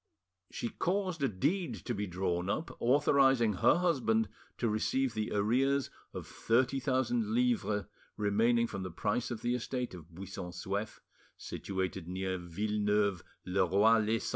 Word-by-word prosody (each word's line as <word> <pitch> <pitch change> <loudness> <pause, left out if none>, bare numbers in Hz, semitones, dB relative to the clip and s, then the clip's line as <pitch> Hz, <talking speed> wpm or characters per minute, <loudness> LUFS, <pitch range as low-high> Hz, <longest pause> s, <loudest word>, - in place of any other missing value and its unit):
She 120 - -4
caused 185 - -1
a 135 - +3
deed 165 - -1
to 120 - -1
be 105 -1 -3
drawn 90 0 -1
up, 155 +11 -2
authorising 135 -3 +4
her 90 - +4
husband 115 - +2 0.3
to 120 - 0
receive 115 +4 0
the 110 -1 -2
arrears 130 +7 +1 0.2
of - - -6
thirty 130 +4 +1
thousand 210 - 0
livres 230 - +1 0.3
remaining 115 +3 +3
from 100 -4 -5
the 95 - -4
price 105 +7 -1
of 115 -3 -5
the 120 0 +1
estate 125 -1 -3
of 85 -3 -11
Buisson 90 0 -7
Souef, 100 +4 -4 0.4
situated 95 -2 -4
near 95 0 -2
Villeneuve 105 +1 0 0.2
le 95 +1 +2
Roi 105 +5 +4
lez 110 +1 0
Sens. - - -2
110 Hz, 150 wpm, -32 LUFS, 95-130 Hz, 0.4 s, authorising